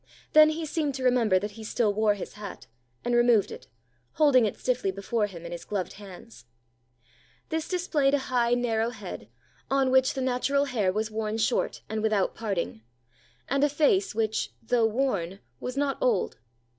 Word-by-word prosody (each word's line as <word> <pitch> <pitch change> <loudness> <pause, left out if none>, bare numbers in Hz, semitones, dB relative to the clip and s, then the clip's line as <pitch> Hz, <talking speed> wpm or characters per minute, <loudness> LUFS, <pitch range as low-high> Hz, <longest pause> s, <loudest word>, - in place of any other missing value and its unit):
Then 310 0 +8
he 315 +1 -3
seemed 300 -3 -1
to 260 - -5
remember 240 -6 +3
that 205 +3 -3
he 220 +2 -10
still 215 -1 0
wore 210 0 +2
his 200 - -7
hat, 205 -2 -9 0.4
and 240 - 0
removed 240 -4 +4
it, 130 - -10 0.5
holding 275 -7 +4
it - - -5
stiffly 250 -5 0
before 205 +3 -1
him 170 -4 -10
in 170 - -7
his 175 - -6
gloved 195 -3 -3
hands. 180 - -13 1.0
This 320 0 -2
displayed 315 -6 +1
a 265 -2 -4
high, 240 -1 +3
narrow 230 -2 0
head, 210 -6 -8 0.4
on 270 -1 +2
which 260 0 +3
the 265 - -2
natural 260 +2 +1
hair 220 -9 0
was 215 +2 -2
worn 215 0 -2
short 220 - 0
and 215 0 -3
without 215 -3 +1
parting, 185 - -3 0.7
and 275 +1 +1
a 290 - +4
face 315 +7 +2
which, 220 -1 0
though 230 0 +2
worn, 210 -7 -1 0.2
was 255 +2 -5
not 280 -1 0
old. - - +1
230 Hz, 175 wpm, -27 LUFS, 205-275 Hz, 1.0 s, Then